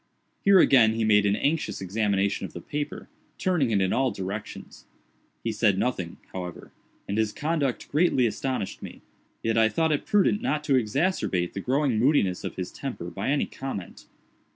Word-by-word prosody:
Here 200 -1 +6
again 115 -10 +5
he 115 - 0
made 105 -1 +4
an 100 - +2
anxious 155 +7 -1
examination 100 0 0
of 95 - -6
the - - -6
paper; 145 - -5 0.3
turning 175 -9 +1
it 105 -3 +2
in 95 - +1
all 135 0 +2
directions. 100 0 -7 0.6
He 115 - -1
said 105 -3 +2
nothing, 95 -8 -2 0.2
however, 90 -2 -7 0.4
and 100 +2 -1
his 110 -1 +1
conduct 145 -3 -1
greatly 150 -5 +2
astonished 125 -2 -3
me; - - -10 0.4
yet 115 0 +2
I 110 -1 +5
thought 160 +5 +1
it 145 - -1
prudent 205 0 +3
not 150 0 -1
to 145 - +1
exacerbate 120 - 0
the 100 - -4
growing 130 -1 +1
moodiness 115 -8 +2
of - - -5
his 90 -1 -5
temper 120 -11 -6
by 85 - -3
any 145 0 +2
comment. 130 -9 -7
115 Hz, 175 wpm, -26 LUFS, 100-145 Hz, 0.6 s, Here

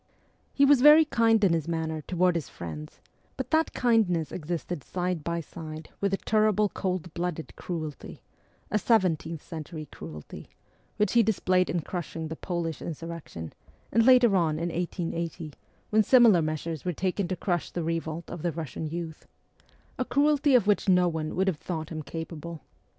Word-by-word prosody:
He 280 - +4
was 280 -2 +5
very 300 +3 +8
kind 225 -6 +3
in 185 -4 +5
his 165 -2 -1
manner 160 -1 -2
toward 180 +3 +1
his 165 -4 -3
friends, 75 -3 -8 0.4
but 265 - -4
that 320 0 +3
kindness 210 - +2
existed 170 -2 -4
side 180 -3 -2
by 170 +1 -2
side 155 0 -9
with 200 - +2
the 195 - 0
terrible 215 -1 +2
cold 180 -4 -3
blooded 175 -2 -4
cruelty 155 -5 -6 0.5
a 210 - +2
seventeenth 170 -8 +1
century 155 -1 -7
cruelty 75 -1 -9 0.5
which 210 -2 +1
he 235 - +6
displayed 185 -4 +2
in 170 - 0
crushing 165 -1 -5
the 160 - -4
Polish 170 -3 -3
insurrection, 165 - -7 0.4
and 230 +2 +4
later 250 -4 +6
on 160 -4 +2
in 170 +2 -2
1880, 170 -2 -3 0.4
when 215 0 +5
similar 225 -5 +6
measures 155 0 -3
were 180 - -1
taken 185 +3 -1
to 185 - -2
crush 175 -3 -1
the 175 - -3
revolt 165 0 -3
of 170 - -6
the 175 - 0
Russian 160 0 -5
youth 165 0 -6 0.7
a - - +2
cruelty 285 +1 +3
of 235 -5 +5
which 205 -1 +2
no 180 -1 +5
one 160 -2 -3
would 190 +1 +1
have 185 -5 +1
thought 160 -3 -4
him 155 -2 -5
capable. 165 +1 -7
170 Hz, 165 wpm, -27 LUFS, 160-200 Hz, 0.7 s, very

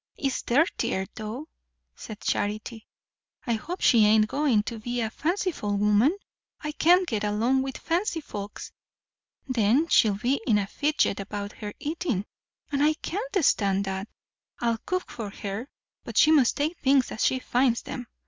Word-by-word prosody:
"It's 275 -2 -1
dirtier, 240 - +1
though," 220 +8 -6 0.5
said 215 -1 -9
Charity. 215 +2 -2 0.6
"I 235 - +1
hope 335 +12 -4
she 230 -3 +5
ain't 215 0 +5
going 265 -5 +2
to 225 +1 -5
be 240 +2 -3
a 220 -2 -1
fanciful 315 - -1
woman. 210 - +3 0.4
I 300 - -4
can't 355 +4 +4
get 215 -6 -2
along 225 +6 +1
with 265 0 -4
fancy 340 0 -1
folks. 205 -8 -7 0.8
Then 255 +5 +2
she'll 210 -3 +4
be 255 +6 0
in 215 - +4
a 205 - 0
fidget 290 -2 0
about 205 +1 -5
her 210 -1 -8
eating; 295 - -2 0.5
and 280 -1 0
I 305 +1 +4
can't 395 - -2
stand 200 -4 +2
that. 190 +1 -4 0.5
I'll 230 -1 0
cook 365 0 -2
for 220 -4 -5
her, 205 +5 -6 0.3
but - - -7
she 310 - +6
must 280 -6 +4
take 310 +4 -1
things 270 -2 +3
as 220 - -2
she 260 - +3
finds 250 -1 +1
them. 245 -2 -6
240 Hz, 160 wpm, -26 LUFS, 210-295 Hz, 0.8 s, she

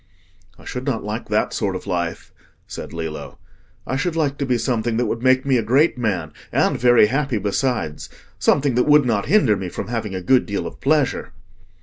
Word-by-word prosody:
"I - - -17
should 125 - -5
not 125 -5 -1
like 105 +3 -5
that - - 0
sort - - -1
of - - -6
life," 85 -2 -3 0.3
said - - -8
Lillo. 80 -3 -6 0.5
"I 130 - -2
should 165 +5 -1
like 145 -4 0
to 140 - -1
be 125 -2 +2
something 115 -2 -1
that 120 - +1
would 115 +1 -2
make 130 +1 +3
me 135 -2 +3
a - - +1
great 135 +9 +3
man, 95 - -2 0.2
and - - +1
very 120 -2 +6
happy 135 +1 0
besides—something 120 - -1
that 125 +3 +1
would 150 -2 +6
not 110 -4 0
hinder 140 - +4
me 95 -2 -4
from - - -6
having 110 -5 -3
a 95 - -3
good 130 +7 +3
deal 100 -1 -3
of - - -8
pleasure." 145 - +1
120 Hz, 200 wpm, -21 LUFS, 105-135 Hz, 0.5 s, very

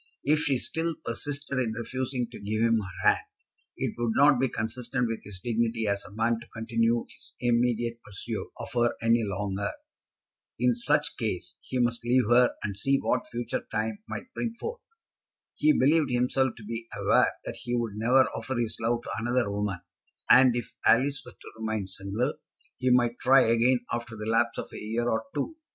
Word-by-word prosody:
If 150 +2 +3
she 145 -4 +2
still 165 +5 -2
persisted 140 +2 -3
in 115 -4 0
refusing 125 +2 -3
to - - -9
give 110 +2 -1
him 115 -1 +4
her 90 -4 -3
hand, - - -5 0.5
it - - -2
would 120 -2 +1
not 140 -2 +6
be 130 0 +2
consistent 120 +3 -2
with 115 -1 -4
his 100 -3 -9
dignity 115 +1 0
as 100 -1 0
a - - -11
man 115 +2 +1
to 120 - -13
continue 115 +1 0
his - - -12
immediate 120 -1 +1
pursuit 100 -2 -5
of - - -6
her 120 -1 +2
any 115 +1 +3
longer. 100 0 -2 0.9
In 125 +1 +3
such 120 0 +1
case - - -3
he 130 - -4
must 120 -1 +1
leave 125 +1 +3
her, 125 +1 +5
and 100 -2 -3
see 135 +8 +2
what 125 -2 0
future 120 0 -3
time 110 - -2
might 255 - -7
bring 235 -3 -2
forth. 465 - -5 0.7
He 305 - +4
believed 155 - +3
himself 125 +1 +1
to 110 - -11
be 115 +2 -5
aware - - +3
that - - -5
he 120 - -3
would 115 -3 -1
never 120 +5 +4
offer 115 +3 -4
his 115 -2 -1
love 120 +1 0
to - - -6
another 120 -1 0
woman; 100 -3 -2 0.5
and 125 -1 +7
if 115 -1 -4
Alice 140 +5 +4
were 125 - -12
to - - -13
remain 110 -2 -2
single, 100 +8 -2 0.5
he 130 - +1
might 120 -1 +3
try 135 +1 +6
again, 115 +2 +3
after 120 -1 -4
the 105 0 -6
lapse 115 +1 +1
of - - -6
a - - -6
year 115 +3 -2
or 110 -1 0
two. 145 - -2
120 Hz, 190 wpm, -28 LUFS, 110-125 Hz, 0.9 s, and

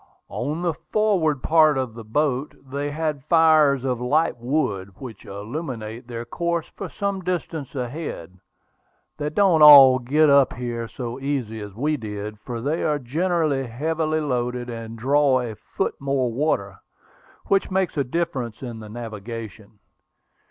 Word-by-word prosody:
"On 150 +7 -3
the 170 -2 +1
forward 170 -6 0
part 155 -3 +4
of 130 -3 -2
the 115 0 -9
boat 135 +4 -1 0.2
they 145 +1 -2
have 150 -2 -3
fires 155 -5 +4
of 125 -2 -1
light 150 +7 +1
wood, 115 -7 -1
which 120 -6 -10
illuminate 115 +1 -6
their 120 -1 -6
course 170 +6 -2
for - - -6
some 200 -1 -3
distance 165 -6 -4
ahead. 125 - -5 0.8
They 150 0 -1
don't 170 -1 +3
all 135 -4 +10
get 150 +6 +3
up 140 -2 +5
here 120 -1 -4
so 120 +1 -6
easy 135 -6 -3
as 105 -2 -9
we 150 +6 0
did, 105 -2 -6
for 115 +1 -6
they 150 +6 -1
are 150 -1 +1
generally 150 0 0
heavily 155 +5 -1
loaded 125 -3 -2
and 115 0 -7
draw 135 +2 +3
a 120 -3 -4
foot 110 +5 -4
more 135 -3 0
water, 100 -8 -1 0.7
which 195 -1 +1
makes 190 -2 0
a 140 - +1
difference 135 -5 -3
in 120 -3 -6
the 110 -1 -10
navigation. 110 -1 -8
135 Hz, 150 wpm, -23 LUFS, 115-155 Hz, 0.8 s, all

